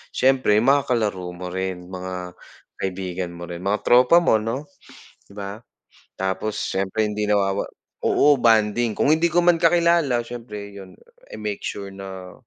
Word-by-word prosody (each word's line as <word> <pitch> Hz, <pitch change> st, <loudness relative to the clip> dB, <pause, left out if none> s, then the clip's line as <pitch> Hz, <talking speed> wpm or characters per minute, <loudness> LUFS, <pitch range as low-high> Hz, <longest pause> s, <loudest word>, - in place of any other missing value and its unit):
siyempre 130 Hz, -5 st, +3 dB
mga 140 Hz, +2 st, +3 dB
kalaro 100 Hz, -7 st, -1 dB
mo 90 Hz, 0 st, -7 dB
rin 95 Hz, -1 st, -3 dB
mga 90 Hz, -1 st, -6 dB, 0.5 s
kaibigan 95 Hz, -1 st, -3 dB
mo 85 Hz, -, -9 dB
rin 85 Hz, 0 st, -7 dB
mga 100 Hz, +3 st, -1 dB
tropa 125 Hz, +8 st, +5 dB
mo 110 Hz, -, +4 dB
no, 130 Hz, +7 st, -4 dB, 0.6 s
'di 100 Hz, -, -17 dB
ba? 100 Hz, +2 st, -6 dB, 0.6 s
Tapos 95 Hz, +3 st, -2 dB
siyempre 100 Hz, +3 st, -1 dB
hindi 105 Hz, 0 st, -2 dB
nawawa 100 Hz, -1 st, +1 dB, 0.3 s
oo 145 Hz, -1 st, +4 dB
bonding 110 Hz, 0 st, +3 dB
kung 145 Hz, -, +2 dB
hindi 160 Hz, +2 st, +3 dB
ko 175 Hz, +1 st, +2 dB
man 175 Hz, -1 st, +4 dB
kakilala 170 Hz, -7 st, +3 dB
siyempre 105 Hz, -4 st, -8 dB
yun, 95 Hz, -2 st, -12 dB, 0.3 s
I -, -, -9 dB
make 105 Hz, -2 st, -4 dB
sure 100 Hz, -1 st, -6 dB
na 95 Hz, -1 st, -9 dB
105 Hz, 155 wpm, -22 LUFS, 95-125 Hz, 0.6 s, tropa